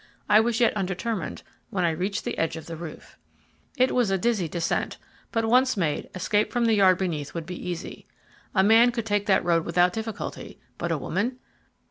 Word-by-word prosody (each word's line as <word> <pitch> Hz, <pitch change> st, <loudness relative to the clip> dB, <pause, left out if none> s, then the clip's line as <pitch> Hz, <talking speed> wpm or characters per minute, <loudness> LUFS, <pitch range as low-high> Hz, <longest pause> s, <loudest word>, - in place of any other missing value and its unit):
I 210 Hz, -, +6 dB
was 225 Hz, +1 st, +1 dB
yet 235 Hz, -3 st, +3 dB
undetermined 195 Hz, -1 st, -3 dB, 0.3 s
when 185 Hz, -3 st, 0 dB
I 170 Hz, -, +2 dB
reached 190 Hz, +5 st, -2 dB
the -, -, -2 dB
edge 165 Hz, -, 0 dB
of 160 Hz, -, -8 dB
the 165 Hz, -, -6 dB
roof. 160 Hz, -1 st, -10 dB, 0.6 s
It 255 Hz, +1 st, +3 dB
was 245 Hz, -5 st, +2 dB
a 195 Hz, -, +2 dB
dizzy 200 Hz, -3 st, 0 dB
descent, 170 Hz, +1 st, -2 dB, 0.3 s
but 225 Hz, -2 st, 0 dB
once 250 Hz, +1 st, +3 dB
made, 155 Hz, -6 st, -1 dB
escape 205 Hz, +3 st, +1 dB
from 240 Hz, -1 st, +1 dB
the 225 Hz, -, +3 dB
yard 190 Hz, -3 st, +5 dB
beneath 165 Hz, -7 st, -3 dB
would 165 Hz, -1 st, -4 dB
be 180 Hz, +1 st, -6 dB
easy. 175 Hz, -2 st, -6 dB, 0.5 s
A 190 Hz, -, +5 dB
man 225 Hz, +4 st, +6 dB
could 230 Hz, -2 st, -3 dB
take 205 Hz, -1 st, 0 dB
that 195 Hz, -, +3 dB
road 170 Hz, -2 st, +2 dB
without 175 Hz, +2 st, +2 dB
difficulty; 220 Hz, -2 st, -6 dB, 0.2 s
but -, -, -2 dB
a -, -, +1 dB
woman! 250 Hz, +1 st, -2 dB
195 Hz, 195 wpm, -26 LUFS, 175-225 Hz, 0.6 s, I